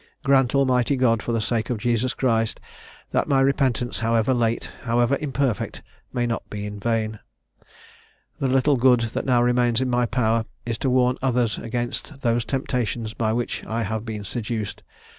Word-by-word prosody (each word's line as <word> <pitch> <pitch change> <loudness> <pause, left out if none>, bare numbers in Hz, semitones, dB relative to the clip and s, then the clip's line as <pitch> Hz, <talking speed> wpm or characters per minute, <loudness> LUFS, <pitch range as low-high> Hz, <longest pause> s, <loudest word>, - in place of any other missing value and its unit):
Grant, 135 -3 +3
Almighty 130 -1 +3
God, 115 -4 +3
for - - -3
the 115 - +1
sake 110 0 -1
of 120 - 0
Jesus 120 +3 0
Christ, 115 -4 +1 0.5
that - - +1
my 135 - +3
repentance, 135 -3 +1
however 115 +2 +2
late, 115 -2 0
however 120 +2 +2
imperfect, 135 -6 -1 0.3
may 120 -1 0
not 115 -2 -1
be 105 0 -5
in 105 0 -6
vain! 110 -1 -1 1.2
"The 135 - +1
little 135 +2 +3
good 125 -1 +5
that - - -2
now 120 -2 +4
remains 120 -1 +2
in 130 -1 0
my 120 0 +2
power 115 -2 +1 0.2
is 115 -1 -3
to 135 - 0
warn 125 0 +3
others 125 -4 +1
against 120 +5 -4
those 120 -2 +1
temptations 120 -4 -2
by 110 -2 0
which 120 +1 -2
I 115 +1 -1
have 110 +1 -3
been 110 -3 -5
seduced. 110 -1 -4
120 Hz, 170 wpm, -24 LUFS, 115-130 Hz, 1.2 s, good